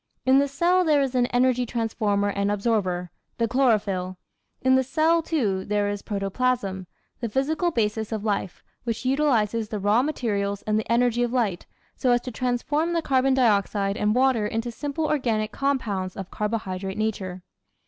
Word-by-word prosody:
In 260 +1 +5
the 280 - +2
cell 345 +6 +2
there 300 -4 +3
is 270 -1 -2
an 245 -1 +2
energy 250 0 +2
transformer 220 -4 0
and 200 0 -1
absorber, 195 -5 -1 0.3
the 230 - +1
chlorophyll. 210 -7 +1 0.5
In 260 0 +4
the 260 - +5
cell, 320 +5 +2
too, 220 - -1
there 205 0 0
is 205 0 -3
protoplasm, 195 -2 -2 0.3
the 235 - -3
physical 310 - 0
basis 220 -6 -1
of 215 -2 -3
life, 200 -3 -2 0.2
which 230 +1 -3
utilises 235 -6 +1
the 215 - -3
raw 205 +4 +3
materials 205 -8 -2
and 215 0 +1
the 220 - -4
energy 240 0 +2
of 240 -1 0
light, 220 -8 -1 0.3
so 255 - 0
as 240 - +2
to 250 - -6
transform 255 +8 -1
the 335 -1 0
carbon 265 -1 +2
dioxide 200 -4 +2
and 210 +1 +1
water 255 -4 +3
into 225 +3 -3
simple 290 +5 -3
organic 230 -8 0
compounds 215 -11 -2
of 195 -1 -7
carbohydrate 195 -3 -3
nature. 190 -4 -3
230 Hz, 170 wpm, -25 LUFS, 205-260 Hz, 0.5 s, In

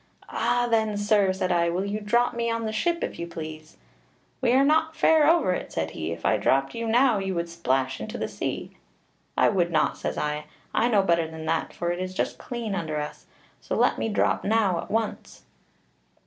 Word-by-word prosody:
'Ah! 245 0 +1
then, 220 -3 +1
sir,' 205 -2 +3
said 185 -1 -1
I, 170 -1 +2
'will 180 +3 -1
you 205 +1 -2
drop 235 +4 +2
me 235 0 -1
on 230 0 -1
the 220 - -2
ship, 335 +10 0
if - - -4
you 170 - -4
please?' 155 -1 -8 0.6
'We 245 -2 +3
are 265 +2 +5
not 320 +2 +2
fair 315 -2 +5
over 325 - +3
it,' - - -5
said 80 0 -2
he; 80 +1 -4
'if 85 0 -6
I - - +3
dropped 135 0 +1
you 230 0 -3
now 240 -1 +4
you 190 -1 -2
would 170 0 -1
go 170 - -13
splash 135 -5 0
into 215 - -5
the - - -2
sea.' - - -5 0.6
'I - - +5
would 175 -4 +1
not,' 160 - +1
says - - -3
I; 150 0 -2 0.3
'I 235 - +3
know 210 -5 +3
better 170 -3 +2
than 160 0 -8
that, 160 0 -1
for 175 0 -2
it 175 - -3
is 185 0 -4
just - - -2
clean 235 -4 -4
under 160 -5 -2
us, 150 0 -7 0.3
so - - -4
let - - +2
me - - -1
drop 210 - +1
now 205 -5 +2
at - - -7
once.' 225 0 -3
195 Hz, 220 wpm, -26 LUFS, 165-230 Hz, 0.6 s, are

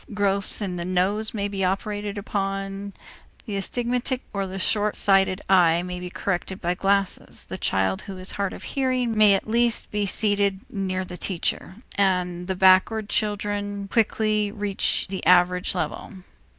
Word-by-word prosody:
Growths 200 0 +2
in 180 -3 -3
the 170 - -3
nose 190 +4 0
may 205 -2 -2
be 195 -1 -3
operated 205 +2 -2
upon, 195 0 -3 0.5
the 210 -5 -4
astigmatic 245 +5 -1
or 195 -1 -2
the 190 +1 -6
short 210 +2 +1
sighted 195 -1 +2
eye 175 -3 +4
may 180 0 -5
be 180 0 -6
corrected 190 +1 -3
by 175 0 0
glasses, 195 +1 -1
the - - -7
child 95 0 +1
who 195 -2 -8
is 185 +1 +1
hard 200 -2 -2
of - - -9
hearing 255 -4 -1
may 210 -2 +6
at 195 - -3
least 235 0 +1
be 210 -1 -1
seated 200 -1 +1
near 190 -2 -2
the 180 0 -8
teacher; 180 +1 -2 0.2
and 180 -2 0
the 190 - -1
backward 190 +3 +4
children 205 -1 -2
quickly 215 -2 +1
reach 205 -1 +1
the 190 0 -5
average 180 0 +4
level. - - -4
195 Hz, 160 wpm, -24 LUFS, 185-210 Hz, 0.5 s, may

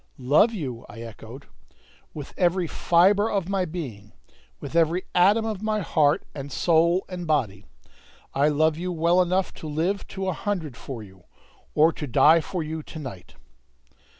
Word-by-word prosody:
"Love 145 - +4
you?" 135 - -5
I 115 - -10
echoed. 115 +3 -11 0.7
"With 145 -3 -9
every 180 0 +1
fibre 195 +6 +3
of 195 -4 -1
my 195 -1 0
being! 125 - -7 0.5
With - - -8
every 170 +2 +2
atom 205 +5 +4
of 215 -3 -3
my 215 -1 -1
heart 150 -4 +2
and 140 0 -7
soul 170 +8 +2
and 180 -2 -6
body! 115 -11 -1 0.7
I 140 +2 +3
love 155 +1 +2
you 180 +1 -3
well 170 +2 +3
enough 185 +1 0
to 155 - -9
live 170 +7 -1
to 190 0 -5
a 185 - 0
hundred 165 - -3
for 115 0 -8
you, 95 -3 -17 0.5
or 160 +2 +5
to 150 - -6
die 155 +6 +5
for 170 +2 -4
you 160 +1 -5
to 155 - -11
night!" 125 - -9
160 Hz, 165 wpm, -25 LUFS, 140-185 Hz, 0.7 s, or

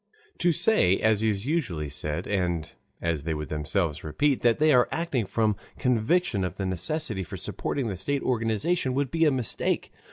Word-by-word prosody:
To 175 - +3
say, 170 - +4
as 110 -1 +2
is 105 -1 0
usually 125 - -1
said, 75 +4 -4
and 90 -5 -1 0.3
as 85 -3 0
they 80 +2 -2
would 75 0 -5
themselves 75 +1 -1
repeat, 135 - +1
that 120 -1 +3
they 155 0 +4
are 125 -1 +4
acting 145 - -1
from 110 0 +1 0.2
conviction 125 - +1
of 90 -3 -3
the 95 - -3
necessity 105 - -1
for 85 - -6
supporting 135 -4 -2
the 100 - -3
state 140 +10 -1
organization, 125 - 0
would 135 -2 0
be 165 0 +3
a 150 - +4
mistake. 125 -4 -1
110 Hz, 180 wpm, -27 LUFS, 90-140 Hz, 0.3 s, say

